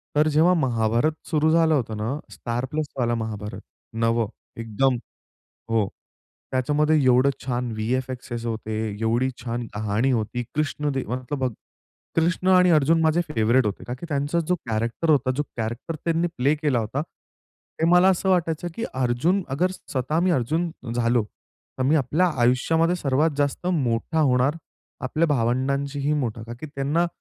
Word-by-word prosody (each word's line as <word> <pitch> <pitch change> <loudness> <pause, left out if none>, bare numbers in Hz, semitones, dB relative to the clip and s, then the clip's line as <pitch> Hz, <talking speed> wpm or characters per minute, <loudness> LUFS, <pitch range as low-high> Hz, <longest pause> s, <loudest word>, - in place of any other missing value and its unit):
तर 150 +1 +4
जेव्हा 165 +4 +5
महाभारत 120 -2 +1 0.2
सुरू 155 0 +2
झालं 165 -1 +4
होतं 115 -6 -1
ना, 115 +7 -2
स्टार 120 +2 -3
प्लसवाला 135 -6 -1
महाभारत, 105 -3 -5 0.4
नवं. 115 -1 +2 0.3
एकदम 120 +4 +1 0.8
हो, 110 -3 +2 0.6
त्याच्यामध्ये 150 +4 +2
एवढं 130 +2 +5
छान 125 -2 -2
व्ही-एफ-एक्सएस 120 +1 -3
होते. 110 -1 -3 0.3
एवढी 120 +4 +1
छान 120 0 -3
कहाणी 110 +5 0
होती. 120 +1 -1
कृष्ण 150 -1 -1
देवाचा 130 +1 -3
भक्त 125 -4 -2 0.6
कृष्ण 175 +3 +1
आणि 180 -1 +6
अर्जुन 160 +1 +4
माझे 160 +2 +3
फेवरिट 120 -1 +3
होते, 105 - -3
का 125 - -4
की 170 - -6
त्यांचा 145 +3 0
जो 180 - +5
कॅरेक्टर 115 +9 0
होता, 140 -3 +3
जो 145 - +1
कॅरेक्टर 120 +8 -4
त्यांनी 165 +1 +1
प्ले 140 +4 +3
केला 145 -5 +1
होता, 120 +7 -2
ते 160 0 -8
मला 180 +1 +6
असं 190 0 +1
वाटायचं 170 -2 +1
की 230 - -3
अर्जुन 130 +10 +1
अगर 180 +3 +2
स्वतः 150 -2 -2
मी - - +3
अर्जुन 160 +4 0 0.2
झालो 120 -1 +2 0.5
तर 130 - 0
मी 140 +4 +3
आपल्या 150 +6 +2 0.2
आयुष्यामध्ये 160 +8 +3
सर्वात 150 +1 +1
जास्त 145 +4 -1
मोठा 155 -2 0
होणार. 130 +1 +3 0.4
आपल्या 155 +6 0
भावंडांशीही 140 +3 0
मोठा, 120 -6 -2
का 115 +1 -8
की - - -5
त्यांना 145 +4 0
135 Hz, 150 wpm, -24 LUFS, 120-160 Hz, 0.8 s, आणि